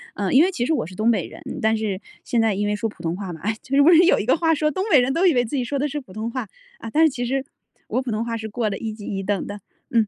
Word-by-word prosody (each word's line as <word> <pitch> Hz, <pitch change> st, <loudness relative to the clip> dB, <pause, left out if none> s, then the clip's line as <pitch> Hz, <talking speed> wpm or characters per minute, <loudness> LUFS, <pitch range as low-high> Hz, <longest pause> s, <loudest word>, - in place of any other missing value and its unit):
呃， 200 Hz, -2 st, -1 dB
因 275 Hz, +4 st, +7 dB
为 375 Hz, -, +2 dB
其 240 Hz, -10 st, -1 dB
实 320 Hz, -, +1 dB
我 305 Hz, -, 0 dB
是 185 Hz, -, -11 dB
东 220 Hz, +4 st, +2 dB
北 225 Hz, -, 0 dB
人， -, -, -12 dB, 0.2 s
但 220 Hz, 0 st, +2 dB
是， 210 Hz, -3 st, -3 dB, 0.2 s
现 235 Hz, -, +1 dB
在 225 Hz, -2 st, +2 dB
因 205 Hz, +1 st, -1 dB
为 210 Hz, -, 0 dB
说 220 Hz, +2 st, -2 dB
普 205 Hz, -, -14 dB
通 165 Hz, +1 st, -1 dB
话 190 Hz, -1 st, -5 dB
嘛。 160 Hz, -, -8 dB
哎， 220 Hz, +4 st, -1 dB
其 270 Hz, -, -3 dB
实 285 Hz, -, +6 dB
不 300 Hz, -, +6 dB
是 340 Hz, 0 st, +7 dB
有 365 Hz, -, +5 dB
一 -, -, -2 dB
个 255 Hz, -, +4 dB
话 325 Hz, 0 st, +2 dB
说 305 Hz, 0 st, +1 dB
东 375 Hz, +6 st, -2 dB
北 295 Hz, -, +7 dB
人 250 Hz, +2 st, +1 dB
都 340 Hz, +5 st, +2 dB
以 345 Hz, -, +5 dB
为 245 Hz, -2 st, +2 dB
自 230 Hz, -, -4 dB
己 260 Hz, -, 0 dB
说 280 Hz, +4 st, -2 dB
的 285 Hz, +2 st, 0 dB
是 295 Hz, +1 st, -4 dB
普 225 Hz, -10 st, -14 dB
通 220 Hz, +3 st, -4 dB
话， 255 Hz, -4 st, -4 dB, 0.3 s
啊， -, -, -7 dB
但 315 Hz, +5 st, +4 dB
是 -, -, +5 dB
其 250 Hz, -3 st, -4 dB
实 270 Hz, +2 st, -1 dB, 0.4 s
我 255 Hz, -, 0 dB
普 255 Hz, -2 st, -4 dB
通 220 Hz, +2 st, -1 dB
话 230 Hz, -1 st, -2 dB
是 220 Hz, -1 st, -6 dB
过 220 Hz, 0 st, -1 dB
了 195 Hz, -, -3 dB
一 225 Hz, -, -4 dB
级 210 Hz, -1 st, -10 dB
一 195 Hz, -1 st, -3 dB
等 200 Hz, 0 st, -1 dB
的， 205 Hz, -, -6 dB, 0.3 s
嗯。 230 Hz, -4 st, +3 dB
230 Hz, 375 characters per minute, -22 LUFS, 210-275 Hz, 0.4 s, 因